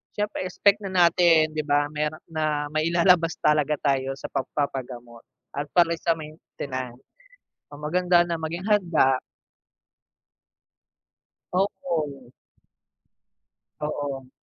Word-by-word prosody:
Siyempre 210 -2 -2
expect 200 +3 +2
na 195 - -4
natin, 170 -3 +4
'di 155 - -1
ba? 145 0 +2
Meron 150 +1 -2
na 155 -2 -1
mailalabas 170 +2 +3
talaga 150 0 +2
tayo 135 -2 0
sa - - -6
pagpapagamot 125 -4 -4 0.3
at 145 +1 -3
para 170 -1 +4
sa 165 -1 +1
maintenance. 130 -5 -7 0.7
So, 145 - -10
maganda 175 +3 +3
na 170 - -1
maging 165 +4 -5
handa. 170 -10 +3 2.3
Oo. 165 -9 -2 1.5
Oo. 140 -3 -4
155 Hz, 100 wpm, -25 LUFS, 140-175 Hz, 2.3 s, natin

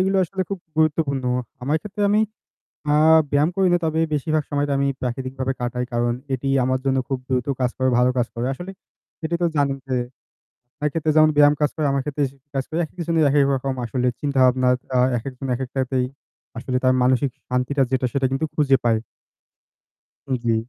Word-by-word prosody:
এইগুলা 190 +1 +2
আসলে 190 +3 -3
খুব 195 - -2 0.2
গুরুত্বপূর্ণ 150 -4 +1 0.4
আমায় 145 +5 +1
ক্ষেত্রে 210 0 -5
আমি 210 +1 +4 0.7
আ - - +4 0.3
ব্যায়াম 145 +3 +3
করি 190 -1 +3
না। 175 - +4
তবে 160 0 0
বেশিরভাগ 155 +2 0
সময় 145 0 0
তা - - 0
আমি 140 0 +1
প্রাকৃতিকভাবে 130 +1 -3
কাটাই। 125 0 -2
কারণ, 120 0 +1 0.2
এটি 135 +2 -3 0.2
আমার 130 +1 +1
জন্য 135 0 +2
খুব 135 -2 -1
দ্রুত 125 -2 0
কাজ 125 -1 +2
করে, 130 0 +2
ভালো 125 +1 +4
কাজ 120 - +2
করে। 120 +1 -2
আসলে 175 +7 -8 0.5
এটি 160 +2 -1
তো - - +4
জানেন 140 -1 +1
যে, 130 - 0 0.9
একেতে 155 +1 -1
যেমন 155 0 +6
ব্যায়াম 145 0 +6
কাজ 150 - +3
করে, 155 - -1
আমার 135 0 +1
ক্ষেত্রে 150 0 -1
সে 135 - -21 0.2
কাজ 135 - 0
করে। 160 - -3
একেক 175 - -17
জনের 165 -2 +3
একেক 140 0 +4
রকম 135 +1 -2
আসলে 125 +2 -1
চিন্তাভাবনা 130 -3 +3 0.3
আ - - +4 0.2
একেকজন 130 +3 -6
একেকটাতেই 130 0 -1 0.5
আসলে 125 +1 -2
তার 130 0 +4
মানসিক 130 +2 +2 0.2
শান্তিটা 125 +2 +1
যেটা 130 -1 +1
সেটা 140 -1 +1
কিন্তু 135 +4 0
খুঁজে 135 -3 +4
পায়। 115 -2 +3 1.3
উম 130 - +1
জী। 115 -1 +2
135 Hz, 185 wpm, -22 LUFS, 130-150 Hz, 1.3 s, যেমন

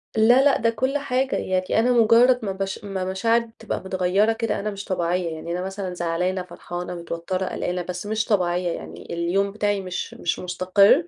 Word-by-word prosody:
لا، 240 +5 +6
لأ 285 - +5
ده 230 - +2
كل 260 +5 0
حاجة، 265 -1 0
يعني 185 +3 0
أنا 245 +2 +3
مجرد 240 +2 +5
ما 195 - -1
بش 195 +1 -4
ما 195 -2 -3
مشاعري 225 +4 +1
تبقى 225 - -3
مِتغَيرة 190 +4 +2
كده 225 -3 -1
أنا 210 +1 -2
مش 200 0 -7
طبيعية، 175 -1 0
يعني 170 +2 -6
أنا 180 - -2
مثلًا 190 -1 -4
زعلانة، 180 +2 -1
فرحانة، 175 0 -6
متوترة، 170 +2 -3
قلقانة، 180 0 -2
بس 180 +2 -5
مش 220 +1 0
طبيعية، 180 -3 +1
يعني 80 - -7
اليوم 185 +4 0
بتاعي 205 -1 0
مش 185 -1 -5
مش 175 - -2
مستقر، 190 - +3
190 Hz, 185 wpm, -23 LUFS, 180-225 Hz, -, لا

